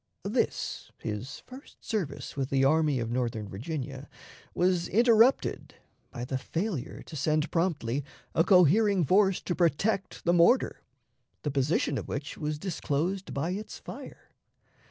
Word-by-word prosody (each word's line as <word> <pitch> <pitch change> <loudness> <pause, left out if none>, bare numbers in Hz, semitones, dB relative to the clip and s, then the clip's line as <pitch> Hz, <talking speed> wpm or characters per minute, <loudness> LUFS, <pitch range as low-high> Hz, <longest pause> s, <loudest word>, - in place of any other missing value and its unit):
This, - - -1
his 110 +6 -5
first 260 +3 -14
service 180 - -3
with 135 -1 -2
the 135 0 +3
Army 150 -2 +3
of 115 -1 -3
Northern 120 -4 -2
Virginia, 135 +5 -6 0.5
was 180 -1 +2
interrupted 230 +3 +3 0.3
by 120 - -6
the 130 +1 -2
failure 165 - -3
to 160 - -10
send 155 +2 0
promptly 145 -7 0 0.3
a 165 - +4
cohering 190 +2 +5
force 195 +2 +3
to 175 - -1
protect 180 +4 0
the 175 - +4
mortar, 175 +10 +4 0.6
the 145 - -1
position 140 +1 +1
of - - -8
which 145 +2 -4
was 150 -1 -3
disclosed 180 +2 -2
by 150 +6 -2
its 205 +3 -5
fire. - - -10
160 Hz, 135 wpm, -29 LUFS, 135-190 Hz, 0.6 s, cohering